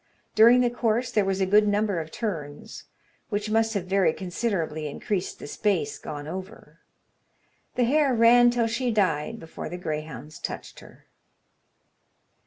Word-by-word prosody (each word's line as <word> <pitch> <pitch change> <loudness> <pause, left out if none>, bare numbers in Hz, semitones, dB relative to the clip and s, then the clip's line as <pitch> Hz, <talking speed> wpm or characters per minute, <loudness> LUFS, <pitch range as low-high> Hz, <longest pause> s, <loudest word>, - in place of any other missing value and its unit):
During 235 +3 +7
the 245 -1 +2
course 240 0 0
there 215 -4 +2
was 195 0 -1
a - - +3
good 210 +2 +4
number 205 -3 +1
of 160 -1 -6
turns, 155 -10 -6 0.4
which 210 0 -2
must 225 0 +2
have 190 -3 -1
very 185 -3 +2
considerably 175 -5 -3
increased 185 +6 -3
the - - -9
space 195 +5 -1
gone 145 -1 -7
over. 190 +6 -9 1.0
The 250 - +2
hare 280 +3 +3
ran 240 +1 +6
till 240 -1 +1
she 235 +2 -1
died 200 -1 0
before 165 -1 -8
the 175 - -6
greyhounds 155 -2 -6
touched - - -6
her. - - -17
205 Hz, 150 wpm, -26 LUFS, 170-230 Hz, 1.0 s, During